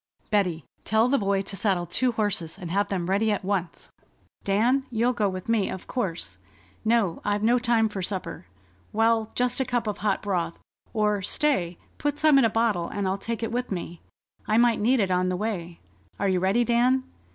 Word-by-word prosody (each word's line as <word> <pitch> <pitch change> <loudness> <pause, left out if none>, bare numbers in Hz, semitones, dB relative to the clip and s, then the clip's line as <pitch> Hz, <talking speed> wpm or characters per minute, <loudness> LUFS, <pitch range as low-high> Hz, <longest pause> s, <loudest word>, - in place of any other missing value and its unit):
"Betty, 180 -8 +1 0.2
tell 220 +3 +3
the 280 - +3
boy 195 -1 +1
to 195 - -5
saddle 190 -4 0
two 245 +8 0
horses 200 -7 -1
and 180 -4 -7
have 200 +2 +1
them 185 -3 -2
ready 205 +3 +2
at 205 -2 -2
once. 190 -3 -3 0.5
Dan, 235 +7 +2
you'll 240 +1 +1
go 215 -4 +1
with 185 -1 -6
me, 225 -4 +1
of 190 - -6
course.... 190 -10 -3 0.4
No, 220 -6 +1
I've 205 0 0
no 240 +3 +4
time 235 -2 +2
for 205 -3 -5
supper.... 185 - -4 0.4
Well, 225 0 +2
just 250 +1 +1
a - - +3
cup 245 -2 -1
of 210 -1 -3
hot 205 -2 0
broth. 175 -5 -1 0.3
Or, 210 -2 +1
stay, 185 - 0 0.2
put 290 0 -1
some 305 -3 +5
in 255 - +4
a - - +3
bottle, 215 -6 +1
and 200 -1 -2
I'll 190 +1 -1
take 230 +2 -4
it 225 - -2
with 245 0 -2
me. 175 -2 -5 0.5
I 215 - +3
might 235 -1 +4
need 250 +4 +3
it 195 -3 +1
on 180 0 +2
the 180 - -1
way.... 180 -5 -4 0.4
Are 200 - 0
you 185 -1 +2
ready, 195 +6 +2
Dan? 245 +2 +3
210 Hz, 200 wpm, -26 LUFS, 190-235 Hz, 0.5 s, some